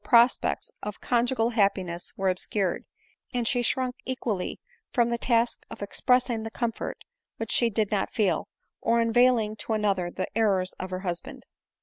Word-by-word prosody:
prospects 245 Hz, -, +3 dB
of 210 Hz, -1 st, -5 dB
conjugal 240 Hz, -1 st, +1 dB
happiness 190 Hz, -6 st, 0 dB
were 195 Hz, -1 st, +1 dB
obscured, 185 Hz, 0 st, -1 dB, 0.5 s
and 240 Hz, -2 st, 0 dB
she 245 Hz, -1 st, +2 dB
shrunk 250 Hz, +1 st, 0 dB
equally 235 Hz, -7 st, -3 dB, 0.3 s
from 235 Hz, -1 st, +2 dB
the 235 Hz, -, +1 dB
task 235 Hz, -1 st, +1 dB
of -, -, -7 dB
expressing 250 Hz, +2 st, +2 dB
the 225 Hz, -, -4 dB
comfort 230 Hz, 0 st, -3 dB, 0.4 s
which 225 Hz, -1 st, -3 dB
she 235 Hz, -, +3 dB
did 215 Hz, -1 st, 0 dB
not 205 Hz, -2 st, +1 dB
feel, 195 Hz, -8 st, +1 dB, 0.3 s
or 235 Hz, 0 st, +3 dB
unveiling 230 Hz, -2 st, +3 dB
to 220 Hz, -, -3 dB
another 200 Hz, -5 st, +1 dB
the 185 Hz, -, -3 dB
errors 195 Hz, -5 st, +2 dB
of 185 Hz, -, -4 dB
her 185 Hz, 0 st, -4 dB
husband. 175 Hz, -3 st, -4 dB
225 Hz, 155 wpm, -27 LUFS, 195-240 Hz, 0.5 s, prospects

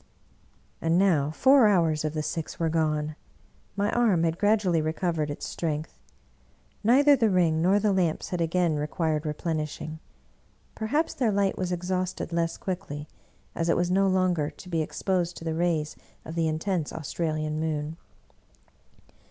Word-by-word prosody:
And 165 Hz, +1 st, +2 dB
now 170 Hz, -7 st, +3 dB
four 260 Hz, -, +5 dB
hours 165 Hz, -6 st, +2 dB
of 155 Hz, 0 st, -2 dB
the 155 Hz, -, -1 dB
six 165 Hz, +3 st, -4 dB
were 165 Hz, -1 st, +1 dB
gone; 155 Hz, -1 st, 0 dB, 0.6 s
my 200 Hz, +1 st, 0 dB
arm 215 Hz, -9 st, +3 dB
had 165 Hz, 0 st, 0 dB
gradually 205 Hz, -6 st, +2 dB
recovered 155 Hz, -1 st, -1 dB
its 145 Hz, -, -5 dB
strength. 155 Hz, -2 st, -4 dB, 0.8 s
Neither 280 Hz, +6 st, +6 dB
the 230 Hz, -4 st, +2 dB
ring 170 Hz, -4 st, +2 dB
nor 185 Hz, +4 st, +4 dB
the 205 Hz, -1 st, +2 dB
lamps 175 Hz, -4 st, 0 dB
had 180 Hz, -2 st, -2 dB
again 165 Hz, -1 st, +1 dB
required 155 Hz, +1 st, -1 dB
replenishing; 155 Hz, 0 st, -3 dB, 0.7 s
perhaps 290 Hz, +9 st, -1 dB
their 240 Hz, -5 st, +1 dB
light 200 Hz, -1 st, +1 dB
was 180 Hz, -1 st, -3 dB
exhausted 180 Hz, 0 st, -2 dB
less 165 Hz, 0 st, 0 dB
quickly, 175 Hz, -6 st, -5 dB, 0.5 s
as 165 Hz, 0 st, -1 dB
it -, -, +3 dB
was 175 Hz, 0 st, 0 dB
no 195 Hz, +1 st, +3 dB
longer 185 Hz, -5 st, +1 dB
to 180 Hz, -, -13 dB
be 165 Hz, -2 st, 0 dB
ex 155 Hz, -, -6 dB
posed 180 Hz, -3 st, 0 dB
to -, -, -9 dB
the 160 Hz, -1 st, -2 dB
rays 160 Hz, -2 st, 0 dB, 0.3 s
of 160 Hz, -, -7 dB
the 165 Hz, -1 st, +1 dB
intense 160 Hz, +1 st, -1 dB
Australian 155 Hz, -1 st, -3 dB
moon. 155 Hz, -1 st, -2 dB
170 Hz, 155 wpm, -27 LUFS, 155-185 Hz, 0.8 s, Neither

